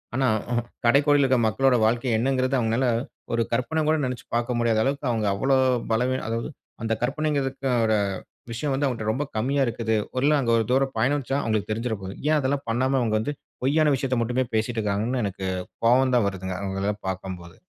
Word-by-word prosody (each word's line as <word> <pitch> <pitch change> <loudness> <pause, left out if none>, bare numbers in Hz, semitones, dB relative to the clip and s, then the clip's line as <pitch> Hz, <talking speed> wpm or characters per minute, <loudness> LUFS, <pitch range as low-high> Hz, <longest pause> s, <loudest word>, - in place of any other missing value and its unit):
ஆனா 130 +1 +1 0.2
ம்ஹூம். 120 -1 0 0.2
கடைக்கோடியில 145 +3 +4
இருக்க 130 -1 +3
மக்களோட 130 +4 +3
வாழ்க்கை 120 +3 +1
என்னங்கிறது 130 +2 +1
அவங்களால, 115 +3 +1 0.5
ஒரு 115 - +2
கற்பனை 155 +7 0
கூட 155 - +3
நினச்சு 125 -1 -5
பார்க்க 120 +1 0
முடியாத 115 -2 +2
அளவுக்கு 140 +1 -1
அவங்க 110 -3 0
அவ்வளோ 135 +7 +2 0.4
பலவீனம் 125 +3 0
அதாவது, 115 +4 -2 0.3
அந்த 115 0 0
கற்பனைங்கிறதுக்கோட 135 -5 0 0.6
விஷயம் 135 +4 -2
வந்து 140 +2 0
அவங்கட்ட 110 -4 -1
ரொம்ப 140 +6 -2
கம்மியா 135 +5 +1
இருக்குது. 110 -1 -1 0.2
ஒருநாள் 145 +3 +3
அங்க 115 - 0
ஒரு 115 - +1
தூரம் 135 +1 +2
பயணிச்சா, 135 +2 +1
அவங்களுக்கு 110 -1 -1
தெரிஞ்சிர 115 +1 -1
போது. 95 +1 -6 0.2
ஏன் 155 - +4
அதெல்லாம் 140 0 -1
பண்ணாம 130 +4 +1
அவங்க 110 -3 0
வந்து, 130 +7 -2 0.3
பொய்யான 150 +2 +3
விஷயத்த 130 -1 -1
மட்டுமே 125 +2 0
பேசிட்டு 115 +1 0
இருக்காங்கன்னு 110 +4 -1
எனக்கு, 95 -1 -4 0.4
கோவம் 130 +2 +4
தான் 115 -5 +3
வருதுங்க, 95 -1 -5
அவங்களலாம் 100 +2 -3
பார்க்கும்போது. 90 -2 -6
125 Hz, 175 wpm, -25 LUFS, 110-135 Hz, 0.6 s, கடைக்கோடியில